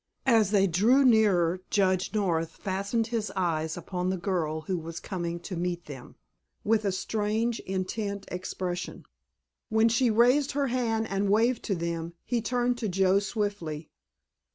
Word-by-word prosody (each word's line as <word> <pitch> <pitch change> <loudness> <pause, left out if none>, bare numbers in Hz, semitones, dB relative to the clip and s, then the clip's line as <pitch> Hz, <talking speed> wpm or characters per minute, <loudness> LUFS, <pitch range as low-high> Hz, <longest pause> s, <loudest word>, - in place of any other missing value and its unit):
As 225 -6 +4
they 200 -2 +4
drew 220 +10 +4
nearer 190 -7 +4
Judge 190 -2 +1
North 170 -6 0
fastened 200 +4 -1
his 220 -2 -1
eyes 160 -3 -1
upon 180 +1 -3
the 190 - -1
girl 170 -4 -1
who 180 +3 -2
was 165 +1 -7
coming 170 -3 -4
to 185 +1 -6
meet 175 0 -3
them, 135 -4 -10 0.5
with 215 0 +2
a 200 - +2
strange, 220 +4 -1
intent 200 +2 -3
expression. 180 0 -4 0.6
When 220 +1 +4
she 235 +2 +3
raised 250 +6 +3
her 280 -1 0
hand 225 -3 0
and 195 0 -1
waved 230 +4 +3
to 195 - 0
them 170 0 -3
he 240 -2 -1
turned 245 +1 0
to 220 -4 -2
Joe 190 +1 +3
swiftly. 200 -8 -3
195 Hz, 155 wpm, -28 LUFS, 175-225 Hz, 0.6 s, As